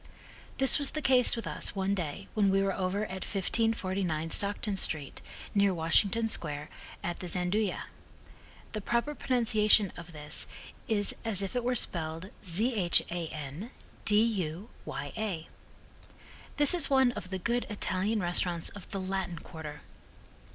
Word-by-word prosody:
This 270 0 +8
was 285 - +2
the - - -1
case 250 -2 +5
with 230 - -5
us, - - 0
one 195 0 0
day 180 0 -4
when 205 -2 +3
we 195 0 +3
were 195 0 0
over 190 +3 -1
at 190 -3 -5
1549 190 -6 0
Stockton 200 0 -1
street, 150 -6 -2 0.3
near 200 -2 +3
Washington 200 +7 +2
Square, 150 -8 -2 0.3
at 175 0 -3
the 180 - -6
Gianduja. 180 +3 0 0.9
The 215 - -4
proper 235 +7 0
pronunciation 220 -7 +3
of 175 0 -10
this 150 -1 -3 0.4
is 205 -4 +2
as 210 -4 +3
if 195 - -5
it 245 - 0
were 250 +1 +1
spelled 165 -3 0
Zhan 175 - 0 0.3
du 210 - +5
ya. 205 -1 -2 1.2
This 290 +1 +6
is 345 -4 +4
one 265 -2 +4
of 180 -6 -7
the 190 - -3
good 235 +6 -1
Italian 210 +1 0
restaurants 175 -1 0
of 200 -3 -12
the 195 - -4
Latin 190 -2 -3
quarter. 155 -2 -9
195 Hz, 140 wpm, -30 LUFS, 175-220 Hz, 1.2 s, This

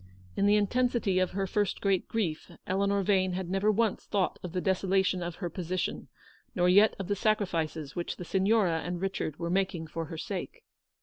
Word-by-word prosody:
In 200 - +2
the 205 - +5
intensity 210 -2 +1
of 185 - +2
her 195 0 0
first 205 +1 0
great 195 -2 +1
grief, 180 -9 -2 0.2
Eleanor 200 +1 +1
Vane 185 -1 +2
had 185 -1 -3
never 195 +3 +2
once 220 0 0
thought 195 -3 0
of 180 - -6
the 180 - -1
desolation 190 0 +1
of 170 -1 -4
her 180 - -4
position, 180 +1 -3 0.5
nor 180 -1 +3
yet 200 +4 +6
of 195 -3 -5
the 205 - 0
sacrifices 170 - -1
which 175 - -3
the 180 - -7
Signora 190 -2 +2
and 175 +2 -3
Richard 190 -5 -3
were 170 0 -3
making 185 -3 0
for 165 +1 -5
her 160 +1 -7
sake. 205 - -5
190 Hz, 190 wpm, -29 LUFS, 175-200 Hz, 0.5 s, yet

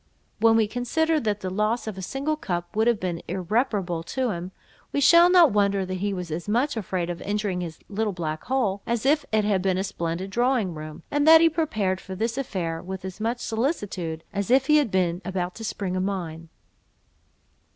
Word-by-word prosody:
When 225 +1 +5
we 225 -1 +4
consider 310 +8 0
that 210 -5 -1
the 185 - -3
loss 215 +5 0
of 215 -3 -5
a 190 - -7
single 275 +10 -2
cup 175 - -4
would 220 +2 +2
have 235 -3 +3
been 175 -2 -3
irreparable 195 -3 -1
to 250 +8 -2
him, 180 0 -5 0.4
we - - 0
shall 340 +5 +7
not 355 -5 +6
wonder 200 -2 +2
that 185 - -5
he 200 +2 -1
was 180 -4 -5
as 170 +6 -4
much 250 +6 +1
afraid 185 -5 -2
of 170 - -7
injuring 205 -3 -2
his 165 -2 -6
little 210 +1 -1
black 155 -4 -4
hole, 225 -7 0
as 235 +1 -1
if 295 +1 +3
it 215 -1 +2
had 200 -3 +2
been 185 -1 +1
a 190 - 0
splendid 175 0 -4
drawing 240 -4 +1
room, 155 -1 -8
and 290 +1 +1
that 320 0 +10
he 330 0 +5
prepared 215 - -1
for 190 - -7
this 225 +4 -1
affair, 180 -11 -3
with 190 0 -7
as 190 +1 -7
much 230 +3 -2
solicitude 205 - -2
as 200 +1 -2
if 265 +1 +4
he 300 +2 +5
had 290 -6 +2
been 180 -2 0
about 180 -1 -3
to 225 - -9
spring 195 -4 -3
a 185 - 0
mine. 170 -4 -4
200 Hz, 210 wpm, -25 LUFS, 180-240 Hz, 0.4 s, that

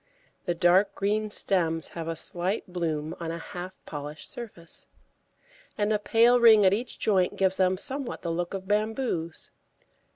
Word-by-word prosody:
The 175 - -1
dark 180 +4 +3
green 210 +2 0
stems 165 -6 0
have 165 -1 -6
a 165 - -2
slight 180 +5 -1
bloom 160 -2 -2
on 165 -1 -4
a 165 - -3
half 180 +2 -8
polished 150 +1 -6
surface, 200 -9 -5 0.9
and 210 +1 +1
a 210 - +1
pale 235 +3 +4
ring 220 -3 +7
at 190 - +5
each 235 +4 -3
joint 190 -4 +2
gives 190 -1 +1
them 185 0 +2
somewhat 270 +3 -1
the 170 - -2
look 175 +3 -2
of 190 0 -7
bamboos. 210 -5 -2
185 Hz, 160 wpm, -27 LUFS, 170-215 Hz, 0.9 s, ring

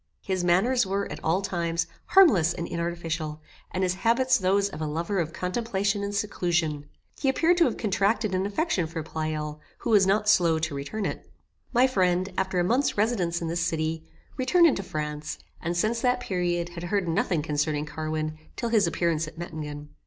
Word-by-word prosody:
His 185 -2 -1
manners 225 +9 +3
were, 200 0 -1
at - - -7
all 180 +5 +1
times, 170 -2 -1 0.2
harmless 235 - +5
and 170 - -4
inartificial, 170 -2 -3 0.3
and 185 - -2
his 180 -1 +2
habits 255 +2 +3
those 195 +1 +2
of 160 -6 -8
a 155 - -1
lover 170 +6 -1
of 165 -2 -1
contemplation 200 +2 -1
and 200 0 -3
seclusion. 170 -7 -1 0.3
He 275 - +1
appeared 330 +6 +3
to 340 - +5
have - - -1
contracted 205 0 +1
an 185 +1 0
affection 205 - 0
for 165 0 -5
Pleyel, 155 -1 -4 0.2
who 235 - -3
was 200 -3 +5
not 210 +2 +2
slow 175 -6 +4
to 160 -1 -2
return 145 +10 -4
it. - - -5 0.4
My 250 +1 +5
friend, 185 -5 +1
after 190 -1 0
a - - +3
month's 245 +9 +1
residence 185 -6 0
in - - -2
this 170 +1 -1
city, 160 -1 -1 0.3
returned 340 +7 +4
into 285 -11 +3
France, 150 -4 -4 0.2
and, 170 +1 -2
since 225 +5 +1
that 250 0 +2
period, 175 -5 -1
had 175 0 -7
heard 195 0 0
nothing 165 -1 0
concerning 150 0 -1
Carwin 155 0 -3 0.2
till 235 - -2
his 220 -3 +3
appearance 165 -2 0
at 155 - -11
Mettingen. 150 -3 -6
175 Hz, 185 wpm, -26 LUFS, 160-210 Hz, 0.4 s, harmless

